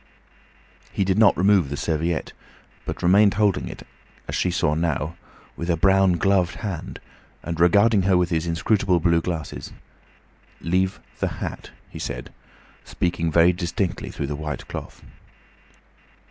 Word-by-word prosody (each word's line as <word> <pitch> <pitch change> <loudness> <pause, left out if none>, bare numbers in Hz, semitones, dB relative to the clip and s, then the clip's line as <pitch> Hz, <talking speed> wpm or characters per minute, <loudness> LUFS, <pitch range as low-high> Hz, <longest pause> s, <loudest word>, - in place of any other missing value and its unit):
He - - 0
did 95 +2 +1
not 110 -3 +5
remove 95 -5 +3
the 70 - -4
serviette, 80 +2 -2 0.5
but - - -5
remained 100 +3 +5
holding 105 -2 +1
it, - - -9 0.4
as - - -5
she 90 - +1
saw 80 -4 +1
now, 80 0 -1 0.4
with 85 - -5
a 85 - +2
brown 95 +2 +4
gloved 95 0 +1
hand, 100 -7 -6 0.4
and 85 -1 -4
regarding 100 +5 +4
her 95 0 +3
with 90 -1 +1
his 80 0 0
inscrutable 90 +2 +1
blue 85 0 +2
glasses. 80 -3 -5 0.9
"Leave 95 +2 0 0.2
the - - 0
hat," - - -6 0.2
he - - -10
said, 60 - -5 0.5
speaking 85 -2 -2
very 85 +3 +5
distinctly 90 +1 -3
through 70 - -4
the 75 +1 -4
white 75 0 -5
cloth. - - -8
90 Hz, 145 wpm, -23 LUFS, 85-95 Hz, 0.9 s, not